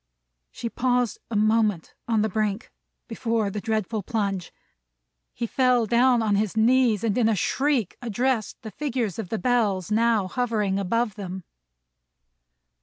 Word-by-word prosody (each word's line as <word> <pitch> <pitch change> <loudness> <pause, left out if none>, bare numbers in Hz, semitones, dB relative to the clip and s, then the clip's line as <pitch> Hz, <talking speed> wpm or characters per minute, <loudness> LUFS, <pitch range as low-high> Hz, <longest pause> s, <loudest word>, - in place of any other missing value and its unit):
She 235 - -6
paused 245 -2 0
a 230 - -4
moment 215 -4 +1
on 220 -2 +2
the - - +2
brink, 215 +2 -2 0.4
before 225 -3 -1
the 210 - -4
dreadful 220 0 -1
plunge. 200 -4 -2 0.8
He 235 - -4
fell 250 -1 +2
down 240 +1 +3
on 210 -2 +1
his 215 +1 -1
knees, 230 -2 +3
and 215 -3 +1
in 230 -3 +3
a 220 - +2
shriek 265 - 0
addressed 240 0 -1
the 220 - -7
figures 245 - -3
in 215 - -4
the 220 - -2
Bells 215 -6 0
now 225 -2 +2
hovering 210 -3 -1
above 225 +3 0
them. 190 -2 -7
220 Hz, 145 wpm, -25 LUFS, 205-240 Hz, 0.8 s, down